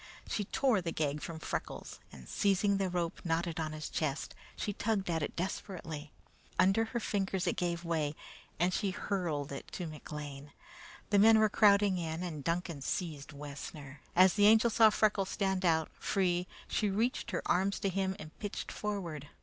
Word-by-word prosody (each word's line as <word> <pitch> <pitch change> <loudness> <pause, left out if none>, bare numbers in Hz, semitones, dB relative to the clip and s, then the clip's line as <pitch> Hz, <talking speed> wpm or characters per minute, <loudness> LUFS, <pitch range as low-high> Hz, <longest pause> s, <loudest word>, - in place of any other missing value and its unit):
She 205 - -1
tore 240 -2 +2
the 165 -1 -2
gag 150 -2 -1
from 165 - -5
Freckles, 160 - -5
and 65 - -12
seizing 200 0 +2
the 195 -1 0
rope 175 -2 -2
knotted 165 0 -1
on 155 -1 -2
his 155 -1 -5
chest, 150 -2 -2 0.2
she 205 - -2
tugged 200 -3 0
at 165 -1 0
it - - -3
desperately. 165 -4 -4 0.5
Under 195 +4 +4
her 235 +2 -3
fingers 195 -4 -1
it - - +1
gave 170 -1 -2
way, 155 -3 0 0.4
and 180 +2 +2
she 200 - 0
hurled 175 -8 -2
it 140 - -7
to 180 - -3
McLean. 150 -2 -7 0.6
The 205 - +5
men 220 +2 +8
were 215 0 +5
crowding 200 -3 +5
in, 165 +1 -3
and 155 -5 -5
Duncan 170 -2 -2
seized 155 -2 -3
Wessner. 145 -1 -8
As 185 0 +7
the 205 -1 +5
Angel 225 +2 +6
saw 225 0 +7
Freckles 210 -2 +2
stand 190 -2 0
out, 160 -3 +2
free, 180 -2 +1 0.2
she 210 - +1
reached 225 +5 0
her 180 - -2
arms 195 +2 +2
to 195 - +1
him 190 0 -1
and 155 -5 -10
pitched 205 -2 -4
forward. 175 -9 -4
180 Hz, 175 wpm, -33 LUFS, 155-200 Hz, 0.6 s, men